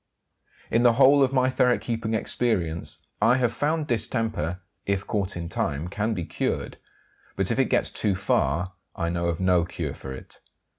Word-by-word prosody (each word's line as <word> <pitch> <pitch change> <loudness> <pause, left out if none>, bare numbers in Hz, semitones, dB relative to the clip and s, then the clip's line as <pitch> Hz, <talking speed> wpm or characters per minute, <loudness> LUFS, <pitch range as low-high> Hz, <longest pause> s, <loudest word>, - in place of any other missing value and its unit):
In 115 - +3
the 120 -1 +6
whole 140 +3 +6
of 135 -1 +4
my 130 -1 +3
ferret 125 -1 +3
keeping 115 -1 -2
experience 95 -7 -1 0.2
I 125 +3 +5
have 125 -2 +1
found 155 +1 0
distemper, 110 - -1 0.3
if 100 -1 0
caught 100 -3 -2
in 85 -1 -4
time, 80 0 -2
can 110 +3 -1
be 90 -4 -3
cured; - - -3 0.6
but - - 0
if - - 0
it - - +5
gets - - +1
too 100 -3 0
far 90 -2 0 0.2
I 85 -3 -1
know 85 0 -1
of 85 -1 -1
no 90 -2 +3
cure 85 - -4
for 65 - -8
it. 65 - -10
105 Hz, 180 wpm, -25 LUFS, 85-120 Hz, 0.6 s, the